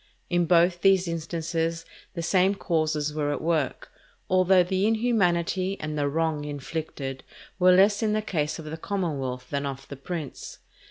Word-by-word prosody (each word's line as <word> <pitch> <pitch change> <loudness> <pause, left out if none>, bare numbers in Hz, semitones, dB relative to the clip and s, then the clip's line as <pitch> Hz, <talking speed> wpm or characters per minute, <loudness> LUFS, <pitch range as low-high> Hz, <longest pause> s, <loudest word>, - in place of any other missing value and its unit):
In 175 -1 +2
both 175 +1 +4
these 190 -2 +4
instances 165 0 -2 0.3
the 170 - -3
same 190 +3 +3
causes 155 -5 -1
were 150 -1 -1
at 145 - -2
work, 155 -5 -1 0.4
although 185 0 +5
the 190 +3 0
inhumanity 195 -5 +1
and 155 0 -4
the 145 -1 0
wrong 160 0 -1
inflicted 145 -2 -5 0.4
were 185 0 +6
less 200 +2 +4
in 215 -1 +1
the 215 0 0
case 155 -7 -1
of 160 - -9
the 155 +1 -6
commonwealth 140 -10 -3
than 140 0 -1
of 135 0 -7
the 140 - -7
prince. 155 0 -6
165 Hz, 160 wpm, -26 LUFS, 150-185 Hz, 0.4 s, were